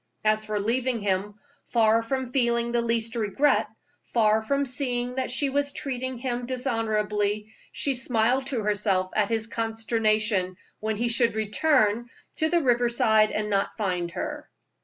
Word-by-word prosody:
As 215 0 +3
for 215 -1 -2
leaving 240 +3 0
him 200 +1 -1 0.3
far 225 -1 +3
from 255 +2 -3
feeling 235 -2 +1
the 240 0 +1
least 230 0 0
regret, 230 +6 +1 0.3
far 220 -2 +2
from 280 +6 0
seeing 250 -2 -1
that 260 0 -2
she 270 +2 +1
was 285 +1 0
treating 260 -2 -4
him 245 -1 -3
dishonorably, 215 -4 -1 0.2
she 280 - 0
smiled 250 +1 +1
to 245 -6 -2
herself 200 -3 +1
at 210 -2 +1
his 225 -1 0
consternation 220 -4 0 0.2
when 215 0 -2
he 240 +2 0
should 235 -1 +3
return 220 0 +1 0.3
to 315 - +1
the 340 -1 +2
river 245 -2 +2
side 220 -2 +3
and 210 0 -2
not 195 -1 -1
find 180 -5 -2
her. 295 - -6
230 Hz, 155 wpm, -25 LUFS, 215-255 Hz, 0.3 s, As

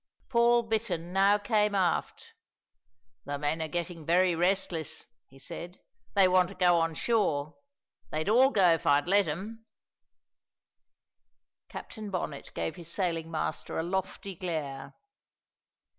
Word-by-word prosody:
Paul 235 -1 +4
Bittern 205 -7 -2
now 195 +2 +4
came 210 0 +1
aft. 180 -4 -1 0.9
"The 145 0 -3
men 150 +3 -1
are 160 - -2
getting 170 +1 -4
very 175 +3 +3
restless," 175 -2 -1 0.2
he 135 - -19
said; 170 +5 -7 0.4
"they 190 - +6
want 185 -1 +3
to 195 - -10
go 175 -1 +4
on 165 -1 0
shore. 155 - 0 0.5
They'd 155 +1 -3
all 250 +5 +5
go 195 -9 +4
if 165 - -3
I'd 145 +1 +3
let 200 0 +4
'em." 205 +9 -5 2.1
Captain 215 -2 -8
Bonnet 170 -7 -5
gave 160 - -3
his 170 -1 -6
sailing 165 -4 -1
master 155 -1 -3
a 160 - 0
lofty 190 +2 -3
glare. 145 -6 -5
175 Hz, 130 wpm, -29 LUFS, 160-200 Hz, 2.1 s, they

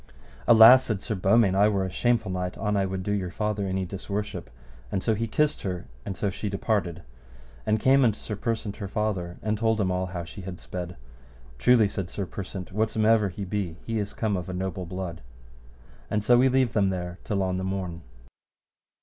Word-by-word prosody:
Alas, 120 +3 +9
said 110 -4 -2
Sir - - -2
Beaumains, 100 +1 +3
I 100 +2 +5
were 100 -3 +1
a 95 - -4
shameful 115 -1 +1
knight 90 0 -3
an 105 -1 -1
I 100 -1 +1
would 95 0 -4
do 105 - -2
your 95 -3 -1
father 105 +1 -2
any 95 0 -1
disworship; 100 -3 -5 0.4
and 95 - -1
so 110 - +2
he 115 +2 -1
kissed 150 +7 +1
her, 90 -3 -4 0.2
and 95 - -5
so 100 - -1
she 100 +2 -4
departed 100 -4 -1 0.6
and 110 0 +2
came 135 +4 +5
unto 110 -3 +2
Sir 105 - -5
Persant 110 -1 -3
her 100 -4 -5
father, 95 -4 -2
and 105 -1 -1
told 110 -1 +2
him 95 -3 +1
all 90 0 -1
how 90 -1 -5
she 85 +4 -9
had 90 -1 -7
sped. 90 -1 -6 0.6
Truly, 115 - +5
said 95 -2 -4
Sir 100 - -4
Persant, 95 0 -7
whatsomever 110 0 +2
he 100 +2 -6
be, 95 -4 -3
he 115 -1 -1
is 105 0 -4
come 110 -3 0
of 90 -1 -4
a - - -4
noble 95 -1 -3
blood. 90 -2 -5 0.9
And 105 -1 0
so 120 +3 +5
we 130 +2 +5
leave 130 -2 +2
them 100 -3 +3
there 90 -1 -4
till 100 -3 -1
on 90 -1 -1
the 95 - -3
morn. 95 -3 -3
100 Hz, 205 wpm, -26 LUFS, 95-110 Hz, 0.9 s, Alas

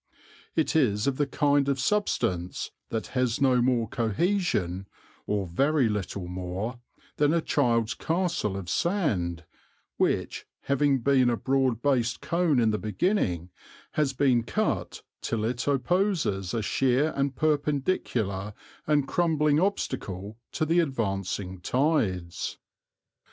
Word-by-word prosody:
It 160 -1 +1
is 105 -9 +2
of 135 -2 0
the 145 - +1
kind 145 0 +2
of 135 -1 0
substance 110 - 0 0.2
that 115 -1 -2
has 125 -3 +1
no 130 -3 +4
more 120 -2 +2
cohesion, 110 - 0 0.4
or 105 -2 0
very 135 - +2
little 100 -3 -3
more, 95 +7 -4 0.4
than 150 +2 +3
a - - +3
child's 120 -7 +1
castle 165 - -1
of 95 -3 -6
sand, 90 - 0 0.5
which, - - 0
having 140 -1 +2
been 130 -1 +4
a 120 - +1
broad 130 -3 +1
based 120 -4 +1
cone 170 -4 +1
in 115 -2 +3
the 105 - -1
beginning, 95 - 0 0.4
has 150 -3 +1
been 130 -3 +3
cut 115 - -2 0.2
till 110 -2 -1
it 120 +2 -2
opposes 140 - +1
a 115 - -1
sheer 135 +7 +2
and 140 -1 0
perpendicular 135 - 0 0.3
and 145 -3 +2
crumbling 150 -1 +2
obstacle 110 - -2 0.2
to 155 - 0
the 165 +3 +3
advancing 100 - -2
tides. 105 - 0
125 Hz, 125 wpm, -27 LUFS, 105-150 Hz, 0.5 s, no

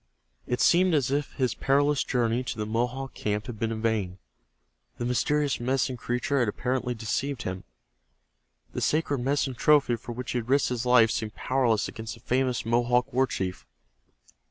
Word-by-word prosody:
It 125 - -1
seemed 180 -1 +4
as 135 -3 +1
if 145 0 -1
his 130 -3 0
perilous 145 +1 +2
journey 120 -1 0
to - - -4
the 105 - -2
Mohawk 125 +5 -2
camp 105 0 -2
had 115 -4 -7
been 115 0 -1
in 110 0 -4
vain. 105 -5 0 0.8
The 120 - -3
mysterious 140 +4 +1
Medicine 130 +1 0
Creatures 125 +4 -1
had 120 - +2
apparently 125 +3 -1
deceived 120 +4 -2
him. 95 0 -5 1.1
The - - -3
sacred 150 -3 +1
medicine 135 +1 0
trophy 135 -1 +3
for 120 +1 -8
which 125 +1 -5
he 125 - 0
had 120 +1 -8
risked 140 +1 +3
his 125 0 -2
life 120 -3 +6
seemed 110 -1 -3
powerless 125 -5 +1
against 110 +1 -7
the - - -16
famous 125 -2 0
Mohawk 120 +1 +1
war 130 +1 +3
chief. 90 - -4
125 Hz, 175 wpm, -27 LUFS, 115-135 Hz, 1.1 s, life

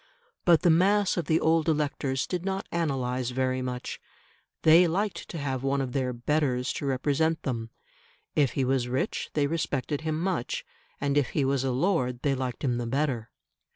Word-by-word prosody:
But 170 -3 +5
the 175 - +6
mass 195 +4 +3
of 175 - -1
the 160 +1 +2
old 160 0 +2
electors 145 -3 0
did 180 -1 -3
not 195 0 -2
analyse 130 -6 -1
very 130 0 0
much: 125 -1 -5 0.6
they 165 +3 +7
liked 195 +5 -2
to 170 - -5
have 135 -4 -2
one 135 +1 0
of 130 -2 -2
their 130 -1 0
"betters" 125 0 0
to 140 - -4
represent 145 +4 +1
them; 115 -3 -3 0.7
if 140 -5 +3
he 135 - 0
was 130 -1 +1
rich 130 - -2
they 145 -2 +3
respected 145 -2 -2
him 155 -1 -2
much; 175 -8 -2 0.3
and 140 0 +2
if 140 - -1
he 140 - +3
was 135 -1 +1
a 135 - 0
lord, 125 -4 0
they 140 - +2
liked 130 -2 -4
him 125 -3 +1
the 120 - -3
better. 130 -3 -1
140 Hz, 185 wpm, -27 LUFS, 130-160 Hz, 0.7 s, they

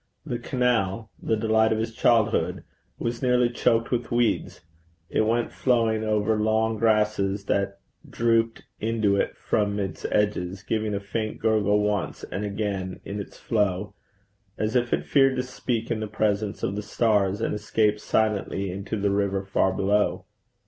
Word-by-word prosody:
The 125 -6 -3
canal, 115 -5 0
the 110 - 0
delight 110 0 +3
of 110 - +2
his 115 +1 -2
childhood, 115 -2 +2 0.3
was 115 0 -3
nearly 125 -2 +3
choked 115 -1 +1
with 120 -1 -1
weeds; 120 -1 0 0.5
it 110 - +2
went 115 +1 +1
flowing 115 -3 +1
over 110 0 +1
long 110 0 +1
grasses 105 -3 +1
that 100 0 0 0.3
drooped 115 -1 +1 0.2
into 110 -2 +1
it 100 - -1
from 105 -1 0
its 95 -2 -4
edges, 100 -2 0
giving 110 -1 -1
a - - -1
faint 105 +2 -3
gurgle 105 -2 +2
once 105 -3 -2
and 100 - -4
again 100 -3 -3
in 100 +1 -4
its 100 - -8
flow, 105 -3 -1 0.6
as 110 +3 -1
if 120 -1 +1
it - - 0
feared 135 -2 +4
to 125 - -1
speak 120 -2 -3
in 115 - 0
the 110 - -3
presence 105 -1 -1
of 95 - -1
the 105 - -2
stars, 105 -2 +1
and 115 - -1
escaped 105 0 +1
silently 105 -3 0
into 100 +3 -4
the 100 0 +1
river 100 -1 0
far 95 0 +2
below. 100 +2 +1
110 Hz, 160 wpm, -25 LUFS, 100-115 Hz, 0.6 s, feared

